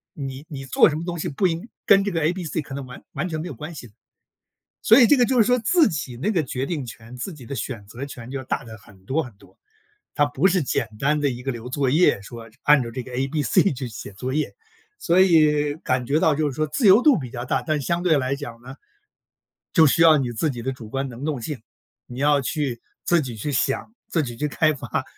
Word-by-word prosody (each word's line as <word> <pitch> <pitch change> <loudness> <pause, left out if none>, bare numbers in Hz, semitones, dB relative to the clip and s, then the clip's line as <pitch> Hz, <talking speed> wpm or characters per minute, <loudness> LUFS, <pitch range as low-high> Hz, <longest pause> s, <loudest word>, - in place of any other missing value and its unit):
你 135 0 -6
你 135 -3 -7
做 130 - +5
什 150 - -3
么 160 - -4
东 175 -1 -4
西 - - -3
不 165 +7 +1
应 170 +5 -3 0.2
跟 195 0 +6
这 200 - -2
个 165 -3 -1
A、 160 +3 +2
B、 185 -1 -5
C 160 - -2
可 140 - -10
能 140 -1 -5
完 125 0 -11
完 - - -2
全 160 -3 -4
没 170 - -5
有 155 - -6
关 150 +7 -8
系 130 - -9
的。 105 - -23 0.9
所 225 - +7
以 240 - +8
这 290 - +5
个 250 - +4
就 255 0 +1
是 215 - +5
说 250 +1 +3
自 305 +7 +4
己 145 -6 -5
那 165 - -1
个 180 -7 +1
决 130 -1 -3
定 155 -5 -3
权、 115 +1 -11
自 155 +10 -5
己 130 -6 -13
的 140 - -5
选 120 -6 -5
择 120 +6 -7
权 125 -3 -10
就 135 0 -4
大 135 - -2
得 110 -2 -10
很 95 -1 -20
多 140 +10 0
很 125 - -10
多， 100 - -22 0.6
它 145 - +3
不 145 +6 +1
是 180 -2 +2
简 120 -4 -1
单 150 +5 +1
的 145 - +2
一 125 0 -6
个 135 - -2
留 120 0 -8
作 135 0 0
业 155 - +4
说 115 +2 -10
这 115 - -28
按 150 -2 +5
照 115 - -5
这 125 +2 -5
个 125 - -11
A、 130 +2 -1
B、 150 +1 -1
C 130 - +3
去 130 -1 -5
写 110 -2 -9
作 125 +7 -5
业， 155 0 -1 0.4
所 175 +2 +3
以 150 -5 +4
感 130 -6 -1
觉 145 +5 +1
到 160 -2 +3
就 150 0 0
是 - - -8
说 155 +3 0
自 180 - 0
由 200 +5 +7
度 290 -3 +5
比 130 -5 -6
较 120 0 -5
大。 - - 0
但 155 -2 -1
相 170 +5 -1
对 165 -5 +3
来 130 0 -1
讲 120 -5 -8
呢， 130 +2 -10 1.0
就 160 - +6
需 155 +3 +3
要 160 -2 +7
你 130 -3 -1
自 150 +7 0
己 120 -3 -6
的 135 +3 -2
主 120 -4 -10
观 135 +4 -3
能 125 +2 -8
动 150 -4 -2
性， 145 -1 -5 0.5
你 125 - -9
要 145 +1 +3
去 135 -4 -2 0.2
自 175 -1 +3
己 125 -4 -6
去 110 +7 -3
想、 135 - -1
自 170 -7 +1
己 120 -4 -6
去 150 - -1
开 155 +1 +2
发。 135 -3 -3
140 Hz, 285 characters per minute, -23 LUFS, 125-160 Hz, 1.0 s, 以